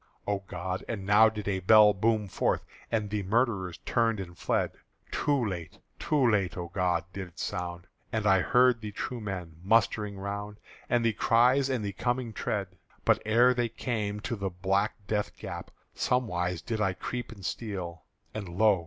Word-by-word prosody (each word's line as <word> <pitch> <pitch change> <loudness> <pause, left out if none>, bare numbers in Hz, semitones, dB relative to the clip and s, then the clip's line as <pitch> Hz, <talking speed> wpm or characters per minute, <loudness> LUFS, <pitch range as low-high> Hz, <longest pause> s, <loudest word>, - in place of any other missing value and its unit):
O 100 -1 0
God! 90 +2 -4
and 100 -5 -3
now 105 +2 +6
did 105 -2 -6
a 95 -2 0
bell 105 +2 +7
boom 105 +1 +1
forth, - - 0 0.3
And 105 -3 0
the 105 -1 0
murderers 100 -3 0
turned 115 -2 +2
and 85 -2 -7
fled; - - 0 0.4
Too 140 -4 +1
late, 85 -4 -5 0.2
too 145 -5 +2
late, 100 -6 +1
O 85 -1 -4
God, 90 -2 +1
did 95 0 -5
it 90 - -21
sound! 85 -1 -4 0.3
And 110 -3 -1
I 95 -2 +5
heard 125 +2 +4
the 105 -1 -5
true 120 +3 -4
men 90 -6 -5
mustering 105 -1 +2
round, 100 +1 -5 0.3
And 120 -1 +2
the 115 - +3
cries 125 +6 +4
and 125 -5 -1
the 100 - -3
coming 120 +2 -1
tread. 100 -2 -2 0.4
But - - +4
ere 120 +3 +5
they 120 -2 0
came, 105 -3 -2
to 120 - -3
the 100 -2 -2
black 95 +3 0
death 105 0 -2
gap - - -7 0.2
Somewise 90 -9 0
did 110 -2 -2
I 95 -3 +2
creep 120 +6 -5
and 100 -4 -10
steal; 90 -9 -4 0.3
And 105 -4 -5
lo! 100 +2 +4
105 Hz, 180 wpm, -29 LUFS, 95-115 Hz, 0.4 s, bell